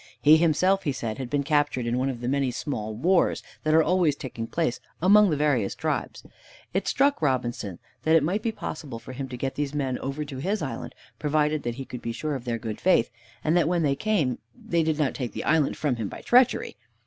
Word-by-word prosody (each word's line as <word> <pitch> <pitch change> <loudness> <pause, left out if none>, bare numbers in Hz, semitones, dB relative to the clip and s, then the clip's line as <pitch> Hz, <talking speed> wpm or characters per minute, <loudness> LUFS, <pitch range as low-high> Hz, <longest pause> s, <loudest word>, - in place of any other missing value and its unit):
He 155 +2 +7
himself, 175 +4 +3
he 150 - -1
said, 115 -3 -4
had 130 -2 -4
been 145 +1 0
captured 145 -4 +1
in 120 +1 0
one 135 +1 0
of 120 -3 -5
the 120 - -3
many 135 0 +1
small 110 -4 -4
wars 175 - +2 0.2
that 155 0 +3
are 160 - +6
always 175 -4 +2
taking 115 -5 -6
place 160 -5 -1 0.2
among 205 +3 +6
the 150 - 0
various 135 -9 +1
tribes. - - -3 0.5
It 190 +1 -1
struck 280 +1 +2
Robinson 120 - -1 0.2
that 160 +1 +3
it 160 - +5
might 185 +7 0
be 230 - -1
possible 155 - -6
for 115 - -10
him 135 +1 -5
to 125 - -6
get 135 +2 -2
these 145 0 -3
men 135 -3 -1
over 140 +3 -4
to 140 -2 -7
his 195 +10 -1
island, 135 - -5 0.2
provided 150 0 +1
that 120 -2 -3
he 135 +1 -6
could 125 -2 -8
be 115 - -3
sure 150 +5 -3
of 130 -3 -5
their 120 -1 -1
good 110 -1 -6
faith, 175 -12 +3 0.3
and 155 +2 +2
that 170 -3 +3
when 175 -1 +1
they 140 -2 +2
came, 155 - 0 0.2
they 170 -1 -1
did 160 -1 0
not 150 -3 +1
take 125 -5 -4
the - - -4
island 155 -3 +2
from 140 -5 0
him 110 -4 -3
by - - -9
treachery. 250 0 +3
145 Hz, 230 wpm, -26 LUFS, 125-160 Hz, 0.5 s, He